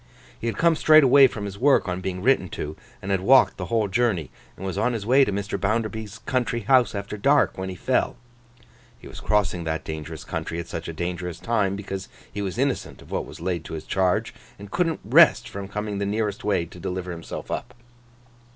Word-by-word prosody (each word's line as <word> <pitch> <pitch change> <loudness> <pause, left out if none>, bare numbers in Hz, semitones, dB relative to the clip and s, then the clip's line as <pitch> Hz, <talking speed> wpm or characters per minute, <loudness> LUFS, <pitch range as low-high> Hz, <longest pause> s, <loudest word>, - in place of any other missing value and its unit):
He 115 - -4
had 115 - -2
come 165 -1 +4
straight 155 0 +6
away 135 +1 +7
from 105 -4 -6
his 100 0 -7
work, 140 -5 +4
on 90 0 -2
being 90 0 -4
written 125 -7 +3
to, 75 +1 -5 0.3
and 100 - -3
had 95 -1 +1
walked 130 +7 +5
the - - -4
whole 115 -3 +1
journey; 95 - 0 0.3
and 95 - -7
was 95 -3 -3
on 125 - +1
his 110 -3 -4
way 130 +4 +5
to 115 - 0
Mr. 100 +1 -3
Bounderby's 110 0 -2
country 120 -2 0
house 125 +1 +3
after 100 +1 -5
dark, 140 +6 +3
when 95 0 -4
he 95 - -6
fell. - - 0 0.8
He - - -13
was - - -9
crossing 95 -5 0
that 80 0 -2
dangerous 80 0 -6
country 85 - -4
at 85 0 -5
such 85 0 -6
a - - -3
dangerous 90 +1 -4
time, 105 -3 0
because 95 -1 -6 0.2
he 100 - -3
was 95 0 -4
innocent 135 +1 -2
of - - -17
what - - -2
was 75 +3 -11
laid 85 -2 -2
to - - -6
his 80 - -6
charge, 95 -2 0 0.2
and 100 0 -11
couldn't 165 -3 0
rest - - +6
from 100 0 -6
coming 105 0 -4
the 100 - -1
nearest 105 -1 -2
way 100 -5 +1
to 85 +1 -13
deliver 90 0 -4
himself 85 -1 -7
up. - - -4
100 Hz, 215 wpm, -24 LUFS, 90-115 Hz, 0.8 s, away